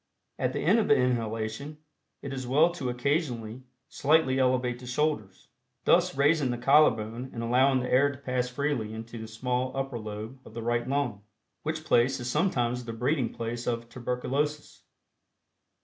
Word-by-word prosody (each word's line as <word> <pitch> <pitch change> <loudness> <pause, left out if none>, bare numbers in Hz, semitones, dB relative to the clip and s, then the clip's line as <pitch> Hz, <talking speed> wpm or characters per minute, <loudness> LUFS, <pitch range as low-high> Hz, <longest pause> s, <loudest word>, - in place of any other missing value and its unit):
At - - 0
the - - -2
end 235 - +4
of 215 - +1
the 220 - +6
inhalation, 115 +3 -1 0.5
it 140 - -5
is 130 -2 -5
well 155 +7 +4
to 140 -7 -4
occasionally 125 -3 -1 0.3
slightly 145 -3 +2
elevate 125 -1 +1
the 125 - -10
shoulders, 125 -7 -2 0.4
thus - - +4
raising 145 -1 +3
the 120 - -1
collarbone 120 -3 +3
and 115 - -5
allowing 130 +3 +3
the 125 - -4
air 140 +3 +5
to 135 - -10
pass 125 -2 -2
freely 125 -5 -2
into 115 +1 -7
the 110 - -7
small 125 +3 -2
upper 135 -3 -2
lobe 110 +4 -7
of 110 - -14
the 115 - -4
right 120 +1 0
lung, 135 -7 -1 0.4
which 155 0 -3
place 120 0 +3
is 120 - -5
sometimes 125 -7 0
the 115 - -5
breeding 125 +2 0
place 115 +1 -5
of 115 -1 -2
tuberculosis. 135 +5 -3
125 Hz, 165 wpm, -28 LUFS, 115-140 Hz, 0.5 s, the